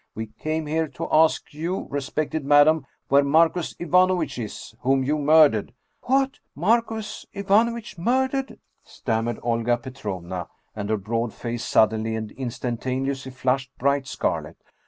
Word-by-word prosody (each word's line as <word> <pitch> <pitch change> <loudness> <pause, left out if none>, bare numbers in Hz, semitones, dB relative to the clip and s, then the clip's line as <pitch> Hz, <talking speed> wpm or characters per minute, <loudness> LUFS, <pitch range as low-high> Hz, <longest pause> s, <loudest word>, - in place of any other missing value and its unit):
We 110 0 -5
came 155 0 -2
here 160 +2 0
to - - -6
ask 160 -1 +3
you, 170 +5 -3
respected 145 +2 -2
madam, 145 +1 +5 0.2
where 140 +1 +5
Marcus 160 +4 +2
Ivanovitch 180 -3 +2
is, 110 0 -7
whom 135 +1 +2
you 150 +3 0
murdered! 145 -8 +4
" - - -47
" - - -47
What? 270 +1 +2 0.2
Marcus 220 +4 0
Ivanovitch 210 +1 +1
murdered? 260 +6 0
" - - -47
stammered 115 -1 -2
Olga 120 0 +1
Petrovna, 95 -8 -6 0.3
and 105 -1 -4
her 110 - +2
broad 115 +3 -2
face 120 -1 -4
suddenly 110 +1 +2
and 110 -1 -5
instan 125 -2 -4
taneously 130 +1 -2
flushed 130 +1 -1
bright 140 +1 +1
scarlet. - - -2
140 Hz, 145 wpm, -24 LUFS, 120-165 Hz, 0.3 s, madam